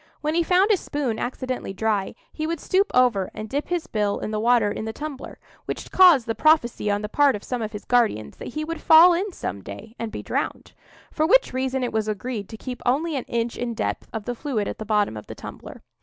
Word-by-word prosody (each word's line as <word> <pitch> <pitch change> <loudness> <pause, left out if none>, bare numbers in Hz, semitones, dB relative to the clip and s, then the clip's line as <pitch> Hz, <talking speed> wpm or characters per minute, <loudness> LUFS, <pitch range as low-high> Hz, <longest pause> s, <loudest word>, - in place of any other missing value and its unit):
When 305 +1 -1
he 340 - +3
found 370 +5 +3
his 395 - +3
spoon 265 -6 -3
accidentally 255 -4 -4
dry, 210 0 -1 0.2
he 310 0 -3
would 335 -1 -2
stoop 390 +6 +1
over 240 -7 +3
and 215 - -6
dip 285 +6 -3
his 350 -2 -2
bill 210 -2 -1
in - - -4
the 215 - -1
water 230 -2 +3
in 220 - -4
the 220 - -4
tumbler; 295 -1 -7 0.3
which - - -5
caused 350 -10 +7
the 225 - -1
prophecy 245 -7 +2
on 205 +1 0
the - - -2
part 280 +3 +3
of 210 - -7
some 250 -2 -3
of 215 -1 -3
his 210 -1 -8
guardians 230 - +1
that - - -8
he 305 0 -2
would 330 0 -5
fall 330 +3 +8
in 385 +4 -1
some—day 100 - -7
and 225 -1 -4
be - - -6
drowned. - - -3 0.4
For 310 0 +1
which - - +4
reason 260 0 -1
it 245 - -2
was 220 -1 0
agreed 215 0 -4
to 220 - -8
keep 250 +1 -7
only 295 +6 +1
an 265 - -3
inch 235 0 -2
in 240 -1 -3
depth - - -3
of 220 -2 -5
the 245 - -2
fluid 240 -5 -2
at - - -5
the 220 - -5
bottom 210 - +1
of 105 - -9
the - - -8
tumbler. - - -10
245 Hz, 240 wpm, -24 LUFS, 215-310 Hz, 0.4 s, fall